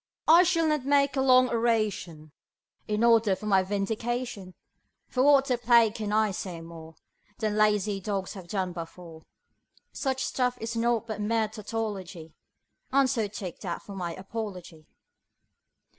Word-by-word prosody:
I 330 +3 +8
shall 335 -2 +2
not 305 -3 0
make 280 0 +2
a 265 - +1
long 255 -1 +5
oration 215 -9 -1 0.6
in 210 +1 0
order 225 -4 +4
for 210 - -10
my 195 -2 +4
vindication, 205 +1 -3 0.5
For 255 - -1
what 275 0 +5
the 250 -3 0
plague 235 -2 +4
can 215 -2 -4
I 215 -1 +2
say 180 -2 -5
more 165 -1 -11 0.4
Than 215 -2 -1
lazy 210 -1 +2
dogs 195 -1 -3
have 185 -4 -10
done 185 -2 -2
before; 165 -1 -9 0.7
Such 265 -2 -2
stuff 250 -1 -1
is 225 +1 -4
naught 230 0 +1
but 220 -2 -5
mere 220 +1 +1
tautology, 200 -6 -6 0.6
And 275 0 +4
so 235 -5 0
take 195 -3 -7
that 175 -4 -5
for 200 - -10
my 175 -3 -4
apology. 185 -6 -7
215 Hz, 150 wpm, -27 LUFS, 190-240 Hz, 0.7 s, I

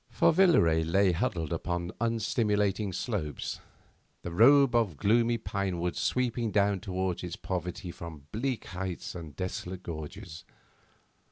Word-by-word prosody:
For - - +3
Villaret 85 - +4
lay 95 +1 +4
huddled 85 -2 -1
upon 85 +1 -2
unstimulating 105 -3 +1
slopes, 90 - -3 0.6
the 85 - -5
robe 135 +8 +6
of 110 -10 +1
gloomy 115 - +3
pine 100 -4 -2
woods 90 +1 -2
sweeping 120 -2 0
down 100 -1 +2
towards 95 -2 -2
its 90 -1 -4
poverty 90 -1 -4
from 85 -4 -9
bleak 125 +2 -2
heights 95 -1 -5
and 80 -5 -8
desolate 95 0 -5
gorges. 80 0 -7
95 Hz, 125 wpm, -29 LUFS, 85-115 Hz, 0.6 s, robe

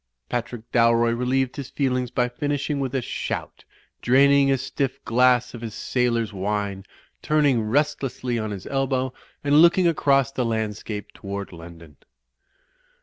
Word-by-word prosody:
Patrick 120 -1 -4
Dalroy 115 0 +4
relieved 130 +1 0
his 140 -3 -6
feelings 125 -3 -1
by 125 0 0
finishing 145 +3 -2
with 135 -1 -2
a 130 - 0
shout, - - -5 0.4
draining 140 +2 +5
a 135 - +3
stiff 135 +1 -3
glass 125 +1 +3
of 120 - -8
his 115 -3 -6
sailor's 115 -3 0
wine, 100 0 -3 0.4
turning 145 -6 +2
restlessly 130 0 -1
on 110 -1 -3
his 100 -3 -6
elbow 130 -1 -1 0.3
and 145 +1 +5
looking 170 +1 +5
across 140 -4 +2
the 130 - -1
landscape 110 -2 -3
toward 100 -1 -6
London. 85 -3 -12
125 Hz, 140 wpm, -24 LUFS, 110-135 Hz, 0.4 s, draining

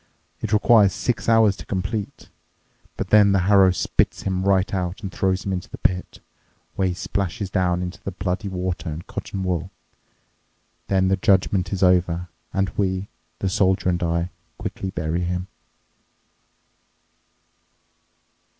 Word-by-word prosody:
It 110 - -3
requires 105 -3 +5
six 115 +5 -1
hours 110 -3 +5
to - - -10
complete. 100 +2 -4 0.7
But - - -3
then 105 -2 +6
the 95 - +3
harrow 95 0 +5
spits 90 - 0
him 95 -1 -1
right 95 0 +2
out 90 +1 -3
and 95 - -4
throws 95 +1 0
him 95 - -1
into 90 -1 -4
the - - -8
pit, 90 +1 -1 0.5
where 95 - +1
he 90 - -2
splashes 100 0 -3
down 90 -2 +1
into 90 0 -6
the - - -4
bloody 95 +2 -3
water 90 -2 -3
and 80 +2 -6
cotton 95 -1 -5
wool. 90 -1 -1 1.2
Then 95 -1 +2
the 95 - +2
judgment 95 -1 +2
is 95 -1 -1
over, 90 -1 +2 0.2
and 95 -1 0
we, 95 -1 -1 0.3
the 95 - -2
soldier 95 0 +2
and 85 0 0
I, 85 +1 0 0.3
quickly 95 - -4
bury 80 -1 -2
him." 90 +1 -2
95 Hz, 145 wpm, -23 LUFS, 90-100 Hz, 1.2 s, then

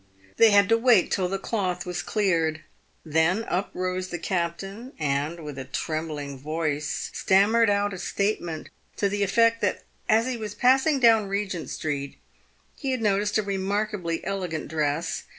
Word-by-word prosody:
They 230 - +7
had 200 -1 +5
to 230 0 +4
wait 230 -6 +4
till 185 -2 +1
the 195 - -1
cloth 190 -3 -2
was 180 -1 -3
cleared. 165 -7 0 0.4
Then 160 +7 +2
up 190 -3 -2
rose 185 0 -2
the 175 - -4
captain, 195 +8 -3
and, 150 +3 -1
with 150 -3 -7
a 130 - -6
trembling 145 0 -4
voice, 150 0 -2
stammered 205 +4 +4
out 205 0 +1
a 185 - -6
statement 190 -5 -2 0.3
to 200 - +1
the 205 +1 -2
effect 230 +3 +3
that 205 - 0 0.3
as 220 +1 +4
he 255 -1 -2
was 215 -2 -6
passing 265 +4 +3
down 225 -4 +5
Kegent 195 -4 -3
street 140 -3 -4 0.6
he 275 - -4
had 255 -2 -1
noticed 205 0 +2
a 215 - +1
remarkably 200 -3 -2
elegant 180 -5 -3
dress. 155 +1 -1
190 Hz, 160 wpm, -25 LUFS, 160-210 Hz, 0.6 s, They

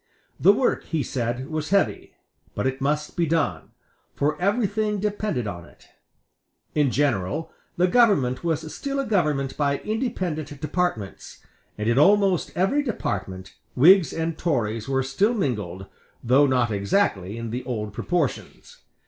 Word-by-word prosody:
The 190 - +7
work, 245 +5 0
he 160 -4 -1
said, 125 +1 -3
was 155 -1 -3
heavy; 200 0 0 0.4
but - - -2
it 130 +1 -2
must 150 +2 -1
be 170 -2 +1
done; 160 -1 -1 0.5
for 150 +2 0
everything 210 +1 0
depended 205 - -2
on 90 -4 -5
it, - - -20 0.8
In 145 -3 +2
general, 130 - -1 0.3
the 180 - +4
government 180 - +3
was 160 -1 -2
still 275 0 -3
a 275 - -1
government 150 - 0
by 140 -1 +1
independent 175 - -3
departments; 150 - -3 0.3
and 105 +1 -2
in 120 +3 +3
almost 195 +1 +4
every 195 +11 +2
department 100 - -4 0.2
Whigs 175 +6 +6
and 165 0 -3
Tories 115 -8 -1
were 135 0 +1
still 195 - +1
mingled, 105 - -2 0.4
though 135 +4 +4
not 125 -3 +1
exactly 100 - 0
in 115 -1 -5
the 125 +2 -4
old 105 -5 -4
proportions. 165 - -3
150 Hz, 140 wpm, -24 LUFS, 120-190 Hz, 0.8 s, The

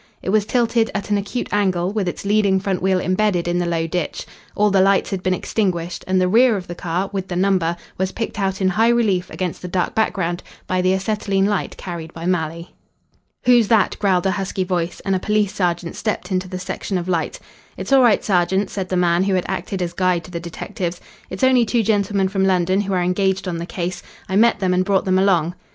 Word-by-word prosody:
It - - -3
was 210 +1 +2
tilted 235 -2 +2
at 205 0 -3
an 205 - +3
acute 205 +5 -4
angle, 190 -2 +1
with 210 -4 -1
its 175 - -4
leading 200 -2 +3
front 190 -1 -2
wheel 190 0 +2
embedded 185 -1 +1
in 175 0 0
the 175 - -1
low 165 -1 0
ditch. 165 0 -3 0.3
All 210 0 +3
the 195 -1 +4
lights 195 +1 +3
had 190 -2 -2
been 185 0 +1
extinguished, 180 -4 -2
and 185 0 +2
the 185 - +2
rear 230 +3 +4
of 185 - -6
the 175 - -6
car, 175 +2 -3
with 190 -1 -3
the 180 - -4
number, 180 -2 +1 0.2
was 190 0 0
picked 225 -2 -4
out 195 0 -1
in 190 - +3
high 225 +4 +3
relief 210 -7 +1
against 180 -3 -4
the 180 - -5
dark 180 0 -1
background 180 -5 0 0.2
by 185 0 0
the 185 +1 +2
acetylene 195 0 0
light 205 -2 -1
carried 170 -3 -7
by 165 0 -6
Malley. 170 -1 -2 0.7
"Who's 240 -3 +5
that?" 220 -3 +3
growled 190 -3 +2
a 190 - +3
husky 195 -1 -2
voice, 180 -2 -2
and 195 -1 0
a - - 0
police 210 0 0
sergeant 175 -2 -1
stepped 215 -2 -3
into 185 0 -1
the 185 0 -5
section 185 +1 -3
of 175 0 -4
light. 170 -3 -1 0.4
"It's - - -2
all 270 - +7
right, 235 -4 +4
sergeant," 190 +1 +1
said 190 -3 -4
the 185 - 0
man 175 +1 +2
who 195 -1 +1
had 180 - 0
acted 190 -1 -3
as 170 - -4
guide 180 -2 +1
to 180 - -12
the 170 - -4
detectives. 175 +1 -5 0.3
"It's 185 +5 -5
only 260 -2 +5
two 230 +1 +1
gentlemen 200 -2 +1
from 190 0 -1
London 185 0 +2
who 200 -1 -3
are 180 -1 +1
engaged 190 +1 0
on 170 -2 -3
the 170 - -5
case. 175 0 -4 0.3
I 190 - -2
met 230 +3 +4
them 185 -1 +2
and 180 0 +2
brought 195 0 +1
them 185 0 +2
along." 180 -4 +2
190 Hz, 230 wpm, -20 LUFS, 180-200 Hz, 0.7 s, all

